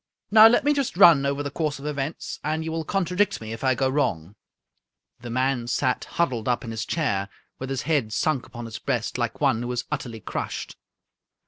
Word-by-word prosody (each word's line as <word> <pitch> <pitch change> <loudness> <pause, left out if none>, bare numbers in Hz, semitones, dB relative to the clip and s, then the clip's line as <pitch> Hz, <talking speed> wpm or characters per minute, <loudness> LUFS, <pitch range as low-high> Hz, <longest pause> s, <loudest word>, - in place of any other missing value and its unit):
Now, 220 +1 +10
let 240 +4 +3
me 295 +1 +3
just 275 -10 -2
run 165 -8 +7
over 140 +1 -1
the 145 - -4
course 150 -2 -2
of 140 - -10
events, 145 +1 -4
and 155 +2 -1
you 160 - -3
will 165 0 -2
contradict 190 +3 0
me 110 0 -6
if 115 - -8
I 130 -1 +3
go 135 - +1
wrong." 100 - -1 0.9
The 120 0 -8
man 130 0 0
sat 125 +1 0
huddled 130 -10 -1
up 120 -1 0
in 115 - -6
his 110 0 -3
chair, 100 -12 -1 0.3
with 130 - -5
his 135 -2 -2
head 145 -9 0
sunk 135 +2 0
upon 120 -1 -8
his 110 -1 -7
breast, - - -2
like - - -2
one 110 - +2
who 120 0 -3
is 120 -1 -2
utterly 120 -6 -4
crushed. - - -5
135 Hz, 210 wpm, -25 LUFS, 120-160 Hz, 0.9 s, Now